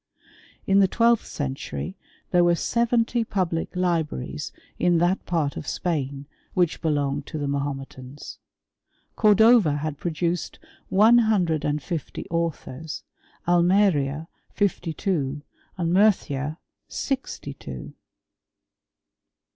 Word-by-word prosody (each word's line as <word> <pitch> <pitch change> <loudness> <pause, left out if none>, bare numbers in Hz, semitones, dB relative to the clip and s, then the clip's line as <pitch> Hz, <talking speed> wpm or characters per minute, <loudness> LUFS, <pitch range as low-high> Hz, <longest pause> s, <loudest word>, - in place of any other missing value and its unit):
In 195 0 +4
the 195 - +6
twelfth 235 +3 +3
century 145 +6 -4 0.4
there 175 -1 +5
were 175 0 +4
seventy 235 +3 +1
public 180 -7 -2
libraries 170 - -1 0.3
in 175 -1 +3
that 175 +3 +2
part 160 -5 0
of 145 - -6
Spain 140 -5 -2 0.3
which 175 -3 +1
belonged 145 -2 0
to 155 - -5
the 145 -1 -2
Mahometans. 140 -1 -5 0.8
Cordova 215 -6 +5
had 150 -1 -4
produced 170 +1 -2 0.3
one 220 +5 +6
hundred 185 -9 +2
and 150 0 -1
fifty 165 -6 -4
authors, 160 -3 -3 0.4
Almeria 170 -4 +3 0.2
fifty* 200 -5 -1
two, 150 -6 -2 0.3
and 170 -1 0
Murcia 155 -7 +2 0.3
sixty 265 - -3
two. 65 - -8
170 Hz, 105 wpm, -25 LUFS, 145-195 Hz, 0.8 s, the